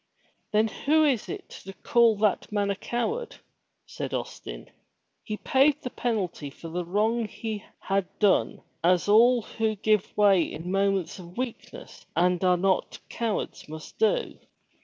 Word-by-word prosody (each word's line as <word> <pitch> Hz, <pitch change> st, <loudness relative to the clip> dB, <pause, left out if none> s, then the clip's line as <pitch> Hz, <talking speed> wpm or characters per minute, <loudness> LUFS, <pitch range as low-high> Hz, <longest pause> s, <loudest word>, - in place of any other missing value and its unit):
"Then 215 Hz, +1 st, +3 dB
who 310 Hz, +8 st, +2 dB
is 265 Hz, -7 st, +1 dB
to 375 Hz, -, -8 dB
call 235 Hz, -2 st, +4 dB
that 210 Hz, 0 st, 0 dB
man 205 Hz, -1 st, +1 dB
a -, -, -1 dB
coward?" 430 Hz, -, -3 dB, 0.5 s
said -, -, -5 dB
Austin. -, -, -7 dB, 0.5 s
"He 215 Hz, -2 st, -4 dB
paid 280 Hz, +5 st, +2 dB
the 250 Hz, -, -4 dB
penalty 190 Hz, -11 st, -2 dB
for 165 Hz, +4 st, -10 dB
the 175 Hz, +2 st, -3 dB
wrong 215 Hz, +6 st, 0 dB
he 215 Hz, -1 st, -5 dB
had 195 Hz, -1 st, -1 dB
done 205 Hz, -3 st, +2 dB, 0.2 s
as 180 Hz, +2 st, +3 dB
all 235 Hz, +3 st, +5 dB
who 220 Hz, 0 st, -1 dB
give 210 Hz, -1 st, 0 dB
way 200 Hz, -3 st, +5 dB
in 165 Hz, +2 st, -4 dB
moments 195 Hz, -2 st, 0 dB
of 175 Hz, 0 st, -12 dB
weakness 255 Hz, -, -6 dB
and 180 Hz, +1 st, +2 dB
are 180 Hz, -1 st, +4 dB
not 190 Hz, +1 st, 0 dB
cowards 225 Hz, -8 st, -3 dB
must 155 Hz, 0 st, -10 dB
do. 470 Hz, +2 st, +1 dB
210 Hz, 145 wpm, -27 LUFS, 185-240 Hz, 0.5 s, all